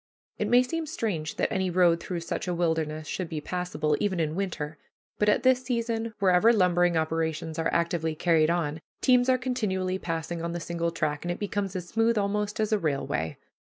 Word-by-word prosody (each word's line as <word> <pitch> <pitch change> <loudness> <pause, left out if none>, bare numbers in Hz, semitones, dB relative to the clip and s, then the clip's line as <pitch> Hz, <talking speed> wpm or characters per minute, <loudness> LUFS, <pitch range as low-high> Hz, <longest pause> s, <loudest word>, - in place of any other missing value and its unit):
It 210 - 0
may 245 +3 +5
seem 325 +5 -3
strange 200 - -3
that - - 0
any 190 -2 0
road 175 -1 +4
through 175 0 -4
such 170 - -4
a 180 - -1
wilderness 160 -2 -1
should 180 +1 -3
be 155 - -3
passable, 155 -2 -1
even 190 -4 0
in 155 -2 0
winter, 160 -5 -3 0.4
but 210 - +3
at - - +2
that 260 -1 +5
season, 230 -3 -2
wherever 195 +3 +5
lumbering 175 -5 +3
operations 160 0 -1
are 165 - +1
actively 165 -2 0
carried 160 -1 +3
on, 160 -2 -1 0.2
teams 250 0 +4
are 255 - +5
continually 195 -8 -1
passing 165 0 -3
on 170 0 -3
the 175 - -3
single 170 0 -2
track, 155 -3 -2
and 175 - -2
it 175 - -3
becomes 200 -2 -3
as 180 -1 -4
smooth 225 +3 +2
almost 205 +1 -1
as 215 0 +1
a 215 - +3
railway. 135 - -2
175 Hz, 195 wpm, -27 LUFS, 160-210 Hz, 0.4 s, may